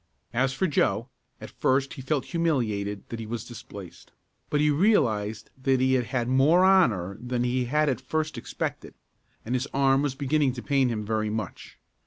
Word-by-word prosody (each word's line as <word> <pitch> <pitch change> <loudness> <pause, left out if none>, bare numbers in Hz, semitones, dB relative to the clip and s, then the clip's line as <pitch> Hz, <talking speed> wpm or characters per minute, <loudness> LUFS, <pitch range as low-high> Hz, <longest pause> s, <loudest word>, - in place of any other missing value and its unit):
As 130 +2 +2
for 160 +8 -1
Joe, 135 -6 +1 0.3
at - - -9
first 135 +1 +1
he 135 - -8
felt 135 0 -1
humiliated 110 - -1
that 115 - -5
he 110 - -6
was 115 -1 -4
displaced 95 -7 -11 0.4
but 150 - +1
he 150 0 +3
realized 110 - +1
that 130 -1 +2
he 130 0 +3
had 125 -2 +2
had 120 0 -2
more 145 +8 +4
honor 110 - +3
that 125 0 -1
he 125 +1 0
had 150 +5 +1
at 130 -2 0
first 155 +3 -2
expected, - - -5 0.5
and 120 - -3
his 130 +2 0
arm 135 0 +4
was 145 -2 -1
beginning 140 -1 +1
to 120 - -7
pain 135 -3 +2
him 105 -3 -3
very 110 0 -1
much. 105 -3 -6
130 Hz, 185 wpm, -26 LUFS, 115-145 Hz, 0.5 s, more